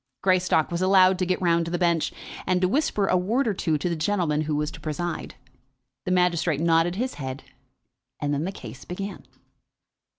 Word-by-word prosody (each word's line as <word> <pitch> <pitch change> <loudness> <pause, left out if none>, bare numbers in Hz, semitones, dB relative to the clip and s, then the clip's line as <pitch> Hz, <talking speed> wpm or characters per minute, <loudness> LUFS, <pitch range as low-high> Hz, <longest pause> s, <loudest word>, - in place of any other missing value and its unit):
Greystock 185 -4 +2
was 170 +1 -2
allowed 185 0 +5
to 185 - 0
get 185 - 0
round 170 -1 +3
to - - -4
the 175 - -1
bench, 170 -2 +1 0.4
and 185 -1 +2
to 185 - +2
whisper 210 -3 +1
a 185 - +2
word 225 +9 +1
or 215 - +1
two 160 -4 0
to 150 - -2
the 170 - -1
gentleman 160 -3 0
who 155 -1 -1
was 150 +1 -1
to - - -10
preside. 165 +2 -4 0.7
The 185 - -1
magistrate 175 -4 +2
nodded 165 +1 +2
his 250 +5 -2
head, 130 0 -5 0.8
and 145 0 -1
then 145 +1 -1
the 190 - -2
case 130 - -10
began. 195 +3 -6
175 Hz, 195 wpm, -25 LUFS, 160-185 Hz, 0.8 s, allowed